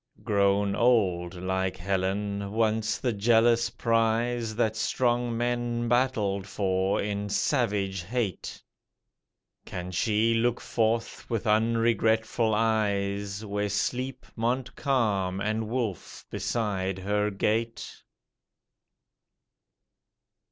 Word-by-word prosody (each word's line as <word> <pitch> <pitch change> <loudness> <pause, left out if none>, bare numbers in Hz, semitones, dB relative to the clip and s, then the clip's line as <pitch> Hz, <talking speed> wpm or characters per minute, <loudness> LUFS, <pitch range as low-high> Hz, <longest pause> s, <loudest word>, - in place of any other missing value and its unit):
Grown 100 -1 +2
old, 95 -8 +2
like 95 +1 -2
Helen, 100 +2 -2
once 110 0 +1
the 125 -3 -1
jealous 115 +2 +3
prize 115 0 0
That 110 -1 +1
strong 120 0 0
men 120 0 -1
battled 110 -6 +1
for 95 -1 0
in 105 0 -2
savage 100 -7 0
hate, 105 0 -3 1.0
Can 90 0 -6
she 110 +4 +2
look 120 +1 +1
forth 115 0 -1
with 115 -1 -2
unregretful 115 0 +2
eyes, 100 -2 0
Where 105 0 -2
sleep 125 +5 -2
Montcalm 115 -5 0
and 110 +2 -1
Wolfe 115 -7 -4
beside 95 -4 -1
her 105 +2 0
gate? 110 +3 -2
110 Hz, 90 wpm, -27 LUFS, 100-115 Hz, 1.0 s, jealous